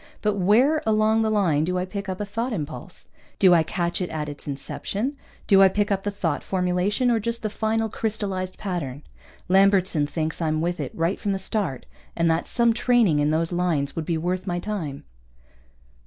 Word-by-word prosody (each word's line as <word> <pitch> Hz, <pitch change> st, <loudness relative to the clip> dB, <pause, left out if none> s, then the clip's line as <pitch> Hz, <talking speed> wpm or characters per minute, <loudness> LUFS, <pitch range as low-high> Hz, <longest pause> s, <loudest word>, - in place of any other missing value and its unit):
But 210 Hz, -1 st, +2 dB
where 230 Hz, -, +3 dB
along 220 Hz, -1 st, +3 dB
the 220 Hz, -, +1 dB
line 180 Hz, -9 st, +2 dB
do 180 Hz, +3 st, -1 dB
I 180 Hz, -, -1 dB
pick 200 Hz, +1 st, -6 dB
up 185 Hz, -, -4 dB
a 210 Hz, -, -2 dB
thought 230 Hz, +5 st, -3 dB
impulse? 160 Hz, +1 st, -6 dB, 0.3 s
Do 185 Hz, -2 st, +6 dB
I 170 Hz, -, +6 dB
catch 170 Hz, +2 st, -2 dB
it 180 Hz, -, -2 dB
at 155 Hz, -2 st, -3 dB
its 145 Hz, 0 st, -9 dB
inception? 195 Hz, -, -3 dB, 0.3 s
Do 195 Hz, -1 st, +6 dB
I 195 Hz, -, +9 dB
pick 205 Hz, +2 st, 0 dB
up 195 Hz, -1 st, +1 dB
the 205 Hz, -, -2 dB
thought 200 Hz, -, -2 dB
formulation, 190 Hz, +6 st, +1 dB
or 230 Hz, -, +2 dB
just 235 Hz, +2 st, -3 dB
the 215 Hz, -, -2 dB
final 220 Hz, +1 st, 0 dB
crystalized 200 Hz, -4 st, -3 dB
pattern? 155 Hz, -9 st, -4 dB, 0.4 s
Lambertson 190 Hz, -5 st, +3 dB
thinks 155 Hz, +2 st, -3 dB
I'm 155 Hz, -1 st, 0 dB
with 175 Hz, +1 st, -1 dB
it 140 Hz, -4 st, -3 dB
right 165 Hz, +4 st, 0 dB
from 205 Hz, -3 st, -1 dB
the -, -, -1 dB
start, 190 Hz, -, -3 dB, 0.3 s
and 165 Hz, -1 st, +2 dB
that 165 Hz, +1 st, -1 dB
some 235 Hz, -1 st, +2 dB
training 230 Hz, -9 st, +3 dB
in 145 Hz, 0 st, +2 dB
those 160 Hz, +2 st, 0 dB
lines 175 Hz, -6 st, 0 dB
would 165 Hz, -, -3 dB
be 165 Hz, 0 st, 0 dB
worth 180 Hz, +4 st, -2 dB
my 175 Hz, -1 st, -1 dB
time. 175 Hz, -8 st, -4 dB
185 Hz, 200 wpm, -24 LUFS, 165-210 Hz, 0.4 s, I